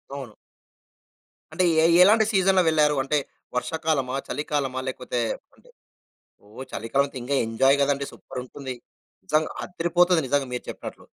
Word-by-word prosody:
అవును. 130 Hz, -6 st, -7 dB, 1.2 s
అంటే 185 Hz, -, +1 dB, 0.2 s
ఏ -, -, +5 dB, 0.2 s
ఎలాంటి 215 Hz, +3 st, +5 dB
సీజన్‌లో 190 Hz, -1 st, +4 dB
వెళ్లారు. 150 Hz, -2 st, +3 dB
అంటే 145 Hz, +3 st, 0 dB, 0.4 s
వర్షాకాలమా, 150 Hz, -2 st, -1 dB
చలికాలమా, 140 Hz, -3 st, -2 dB
లేకపోతే 125 Hz, -1 st, -3 dB, 0.4 s
అదె -, -, -23 dB, 0.8 s
ఓహ్! 110 Hz, +6 st, -9 dB
చలికాలం 135 Hz, +5 st, 0 dB
అయితే 135 Hz, -, -8 dB
ఇంకా 140 Hz, +3 st, -2 dB
ఎంజాయ్ 135 Hz, +5 st, +3 dB
కదండీ 140 Hz, 0 st, 0 dB
సూపర్ 125 Hz, -, -8 dB
ఉంటుంది. 130 Hz, 0 st, -7 dB, 0.5 s
నిజంగా 155 Hz, +9 st, +1 dB
అద్దిరిపోతది 175 Hz, 0 st, +2 dB
నిజంగా 140 Hz, +1 st, +1 dB
మీరు 125 Hz, -, -4 dB
చెప్పినట్లు. -, -, -8 dB
140 Hz, 130 wpm, -25 LUFS, 130-160 Hz, 1.2 s, ఏ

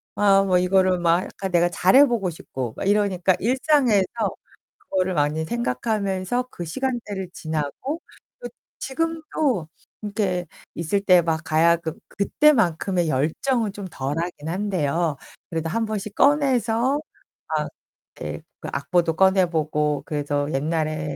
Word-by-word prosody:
아 195 Hz, -1 st, +5 dB
뭐 185 Hz, -2 st, +3 dB
이거를 185 Hz, 0 st, +3 dB
막 170 Hz, +1 st, +3 dB
약간 190 Hz, -1 st, -6 dB
내가 175 Hz, 0 st, +4 dB
잘해 255 Hz, +12 st, +5 dB
보고 230 Hz, -8 st, 0 dB
싶고 130 Hz, -7 st, -6 dB
막 195 Hz, -, -3 dB
이러니까 195 Hz, -3 st, +2 dB
일상에서 255 Hz, -4 st, +3 dB, 0.9 s
그거를 185 Hz, -1 st, 0 dB
많이 150 Hz, +1 st, 0 dB
생각하면서 210 Hz, -, -1 dB
그 175 Hz, -, -6 dB
시간대를 210 Hz, -3 st, -3 dB
지나고 160 Hz, -, -4 dB, 0.4 s
그 -, -, -7 dB, 0.3 s
지금도 305 Hz, -, -1 dB, 0.4 s
이렇게 200 Hz, -4 st, -1 dB, 0.3 s
있을 170 Hz, +4 st, -1 dB
때 185 Hz, -3 st, +5 dB
막 160 Hz, -1 st, 0 dB
가야금 165 Hz, +1 st, +2 dB, 0.2 s
그때만큼의 195 Hz, -, +2 dB
열정은 205 Hz, -, 0 dB
좀 200 Hz, -2 st, -7 dB
덜하긴 150 Hz, +3 st, -4 dB
한데요. 170 Hz, -5 st, 0 dB, 0.3 s
그래도 165 Hz, -1 st, -2 dB
한번씩 215 Hz, 0 st, -2 dB
꺼내서 265 Hz, -2 st, +2 dB, 0.5 s
막 -, -, -1 dB, 0.5 s
예 -, -, -5 dB, 0.2 s
그 -, -, -6 dB
악보도 175 Hz, -3 st, +1 dB
꺼내 190 Hz, +1 st, +4 dB
보고 150 Hz, -2 st, 0 dB
그래도 145 Hz, -1 st, -2 dB
옛날에 155 Hz, 0 st, -1 dB
185 Hz, 275 characters per minute, -23 LUFS, 160-220 Hz, 0.9 s, 아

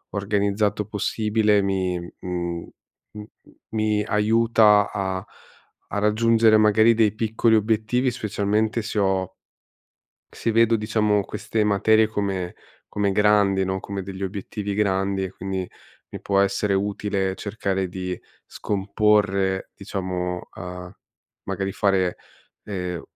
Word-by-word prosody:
organizzato 100 Hz, +1 st, 0 dB
possibile 105 Hz, 0 st, +1 dB
mi 95 Hz, -2 st, -1 dB, 0.2 s
mhmm, 85 Hz, -1 st, -4 dB, 0.4 s
m 105 Hz, 0 st, -8 dB, 0.5 s
mi 110 Hz, -1 st, 0 dB
aiuta 105 Hz, -1 st, +4 dB
a 95 Hz, -2 st, -2 dB, 0.7 s
a 105 Hz, -, -2 dB
raggiungere 110 Hz, +1 st, +4 dB
magari 110 Hz, +2 st, +5 dB
dei 110 Hz, -2 st, +3 dB
piccoli 110 Hz, +1 st, +1 dB
obiettivi, 110 Hz, +4 st, +1 dB
specialmente 110 Hz, 0 st, -1 dB
se 110 Hz, 0 st, -5 dB
ho 95 Hz, -2 st, +1 dB, 1.1 s
se -, -, -1 dB
vedo, 115 Hz, 0 st, +4 dB
diciamo, 105 Hz, -2 st, +1 dB
queste 110 Hz, -1 st, -2 dB
materie 110 Hz, +2 st, +3 dB
come 100 Hz, -4 st, -3 dB, 0.3 s
come 100 Hz, -1 st, 0 dB
grandi 100 Hz, -2 st, +3 dB
no, 95 Hz, 0 st, -2 dB
come 100 Hz, 0 st, -5 dB
degli 95 Hz, +1 st, -8 dB
obiettivi 100 Hz, +1 st, -4 dB
grandi 95 Hz, -1 st, 0 dB
e 95 Hz, -, -5 dB
quindi 95 Hz, -1 st, -4 dB, 0.4 s
mi -, -, -8 dB
può 100 Hz, -1 st, +2 dB
essere 100 Hz, +1 st, +1 dB
utile 100 Hz, -1 st, -1 dB
cercare 100 Hz, -3 st, -2 dB
di 90 Hz, 0 st, -5 dB, 0.3 s
scomporre, 100 Hz, -1 st, 0 dB
diciamo 90 Hz, -3 st, -4 dB
uhm, 90 Hz, 0 st, -7 dB, 0.5 s
magari 95 Hz, 0 st, -3 dB
fare, 95 Hz, -2 st, +1 dB, 0.5 s
ehm, 90 Hz, -4 st, -4 dB
100 Hz, 115 wpm, -23 LUFS, 95-105 Hz, 1.1 s, magari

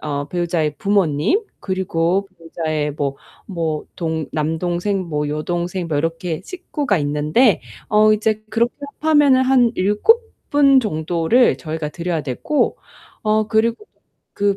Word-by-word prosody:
어 145 Hz, -1 st, -3 dB
배우자의 170 Hz, -3 st, -1 dB
부모님 195 Hz, -, +2 dB, 0.2 s
그리고 190 Hz, 0 st, -1 dB
배우자의 155 Hz, -3 st, -3 dB
뭐 140 Hz, -1 st, -3 dB, 0.3 s
뭐 165 Hz, -5 st, -3 dB
동 160 Hz, -3 st, -2 dB
남동생 175 Hz, +5 st, -1 dB
뭐 150 Hz, -2 st, -1 dB
여동생 175 Hz, +4 st, -3 dB
뭐 150 Hz, -3 st, 0 dB
이렇게 165 Hz, +1 st, -2 dB
식구가 295 Hz, -, -2 dB
있는데 150 Hz, -, +2 dB, 0.3 s
어 215 Hz, 0 st, +5 dB
이제 215 Hz, 0 st, 0 dB
그렇게 235 Hz, +1 st, +1 dB, 0.3 s
합하면은 295 Hz, -4 st, +4 dB
한 255 Hz, -3 st, +3 dB
7 210 Hz, -, +3 dB, 0.3 s
분 280 Hz, -2 st, +5 dB
정도를 175 Hz, +3 st, +2 dB
저희가 155 Hz, -1 st, -4 dB
드려야 170 Hz, 0 st, -2 dB
되고 145 Hz, -, -1 dB, 0.4 s
어 215 Hz, 0 st, +1 dB
그리고 230 Hz, -, +1 dB
또 -, -, -52 dB, 0.4 s
그 200 Hz, -1 st, +1 dB
175 Hz, 265 characters per minute, -20 LUFS, 155-215 Hz, 0.4 s, 어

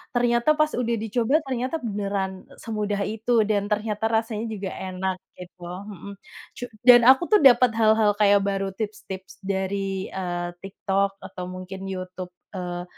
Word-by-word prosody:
ternyata 240 Hz, +4 st, +3 dB
pas 305 Hz, 0 st, +3 dB
udah 235 Hz, -1 st, 0 dB
dicoba 235 Hz, +7 st, +1 dB
ternyata 255 Hz, +2 st, -2 dB
beneran 200 Hz, -3 st, -3 dB, 0.2 s
semudah 210 Hz, -2 st, -2 dB
itu, 220 Hz, +2 st, +1 dB
dan 205 Hz, -1 st, +1 dB
ternyata 210 Hz, +1 st, -1 dB
rasanya 225 Hz, 0 st, -1 dB
juga 205 Hz, -3 st, -4 dB
enak 185 Hz, 0 st, -3 dB, 0.2 s
gitu, 180 Hz, 0 st, -12 dB
hmm, 200 Hz, +2 st, -8 dB, 0.4 s
cu -, -, -6 dB, 0.2 s
dan 240 Hz, -1 st, +10 dB
aku 265 Hz, +5 st, +6 dB
tuh 425 Hz, -, +7 dB
dapat 250 Hz, -2 st, +7 dB
hal-hal 220 Hz, -1 st, +4 dB
kayak 205 Hz, -1 st, +5 dB
baru 195 Hz, -1 st, -1 dB
tips-tips 190 Hz, -2 st, -6 dB
dari, 195 Hz, 0 st, -2 dB
eee, 175 Hz, -2 st, -3 dB
TikTok 195 Hz, 0 st, -1 dB
atau 180 Hz, -, -8 dB
mungkin 185 Hz, +1 st, -8 dB
YouTube, 185 Hz, -1 st, -6 dB, 0.2 s
eee, 175 Hz, -1 st, -4 dB
200 Hz, 145 wpm, -24 LUFS, 190-225 Hz, 0.4 s, dan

